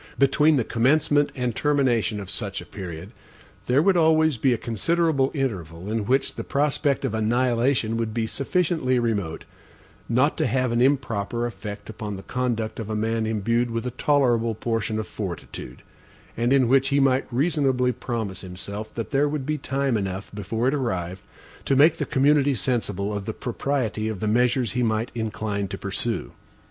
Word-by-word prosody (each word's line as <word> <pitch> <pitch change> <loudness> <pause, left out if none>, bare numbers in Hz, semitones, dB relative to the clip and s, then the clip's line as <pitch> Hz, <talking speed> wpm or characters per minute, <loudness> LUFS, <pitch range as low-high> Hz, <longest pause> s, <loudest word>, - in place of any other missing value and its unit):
Between 150 +3 +4
the 125 - +2
commencement 145 +5 +2
and 125 -3 -2
termination 125 -8 +1
of 100 - -7
such 100 -1 -3
a - - -9
period, 85 -5 -8 0.6
there 130 +5 +4
would 195 0 +4
always 160 -2 +4
be 130 +3 +2
a 120 - +2
considerable 135 - +1
interval, 95 - -3
in 110 -2 -1
which 130 +2 +2
the - - -5
prospect 140 -1 0
of 125 - -2
annihilation 120 +1 +1
would 115 -1 -1
be 115 0 -1
sufficiently 140 0 0
remote, 105 -9 -1 0.6
not 130 +6 +2
to - - +1
have 130 +1 +1
an 120 +1 +1
improper 120 -4 +1
effect 105 -2 -6
upon 105 -2 -5
the 95 - -8
conduct 120 -3 -2
of 110 -2 -5
a 110 - -2
man 110 +1 0
indued 115 +3 0
with 115 +1 -3
a 125 - -2
tolerable 120 -4 +2
portion 115 -1 -1
of 110 - -3
fortitude; 85 - -7 0.5
and 120 +2 0
in 135 -3 +4
which 135 +2 +4
he 140 +1 +2
might 135 -1 +2
reasonably 130 -2 +2
promise 110 -6 -4
himself, 100 +3 -7
that 115 - -4
there 145 +1 +2
would 145 -3 -3
be 150 +1 -1
time 135 -1 0
enough 95 -1 -4
before 105 +4 -2
it 135 - +2
arrived, 95 -9 -2 0.4
to 135 - +1
make 150 +5 +6
the 150 - -2
community 140 0 +3
sensible 105 -4 -1
of 100 -1 -4
the 110 - -2
propriety 120 -3 -2
of 110 -4 -3
the 110 - -2
measures 120 +1 +2
he 125 - -1
might 110 0 0
incline 105 -3 -2
to - - -6
pursue. - - -3
120 Hz, 175 wpm, -24 LUFS, 110-135 Hz, 0.6 s, make